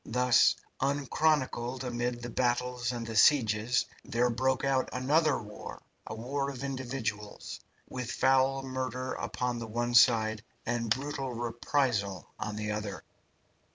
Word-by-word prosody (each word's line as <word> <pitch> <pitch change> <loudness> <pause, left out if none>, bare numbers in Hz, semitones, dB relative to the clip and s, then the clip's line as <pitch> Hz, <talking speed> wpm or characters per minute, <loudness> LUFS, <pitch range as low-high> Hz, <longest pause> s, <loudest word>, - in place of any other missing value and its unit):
Thus, 125 +1 +4 0.2
unchronicled 135 -2 0
amid 120 -1 -2
the 120 - -4
battles 125 0 0
and 120 -2 -4
the 115 0 -6
sieges, 110 -1 +4 0.2
there 120 +1 +1
broke 130 +2 0
out 135 -1 +1
another 145 +3 +2
war, 105 -1 -9 0.3
a 110 - -5
war 140 +5 -2
of 135 -1 -7
individuals, 125 -6 -4 0.3
with 125 -2 -5
foul 135 +1 +3
murder 130 -1 -3
upon 125 -1 -2
the 115 - -5
one 120 +2 -2
side 110 -3 +5 0.2
and 115 -1 -1
brutal 135 +1 -1
reprisal 120 -3 -1
on 105 0 -3
the 105 0 -3
other. 105 -2 -4
125 Hz, 130 wpm, -30 LUFS, 115-130 Hz, 0.3 s, side